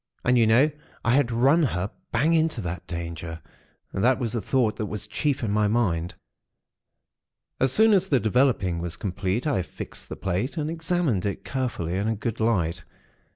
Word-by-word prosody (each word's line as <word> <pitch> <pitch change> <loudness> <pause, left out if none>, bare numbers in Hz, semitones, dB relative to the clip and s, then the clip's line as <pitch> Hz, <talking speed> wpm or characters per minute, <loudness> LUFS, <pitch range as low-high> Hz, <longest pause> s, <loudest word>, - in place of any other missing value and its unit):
And, 125 - +4
you 115 -2 +4
know, 130 +8 +5 0.3
I 120 - +3
had 135 -3 +3
run 135 +8 +4
her 100 - -1 0.2
bang 145 +8 +2
into 160 -5 +2
that 90 -2 -5
danger. 85 -1 -5 0.5
That 120 +7 +3
was 120 -4 -2
the 115 - -1
thought 120 0 +1
that 110 -3 -2
was 105 -1 -4
chief 125 +6 -1
in 105 - 0
my 105 0 +2
mind. 90 -7 0 1.4
"As 130 -1 +3
soon 220 +7 +5
as 190 -1 +3
the 140 -8 +3
developing 110 -6 +2
was 85 -1 -4
complete, 100 - -2
I 140 -11 +1
fixed - - -8
the - - -5
plate, 95 - -2
and 155 0 -1
examined 165 - 0
it 100 - -5
carefully 120 -10 -2
in 100 +2 -1
a 110 - 0
good 115 +2 -4
light. 95 -8 0
115 Hz, 180 wpm, -25 LUFS, 95-135 Hz, 1.4 s, know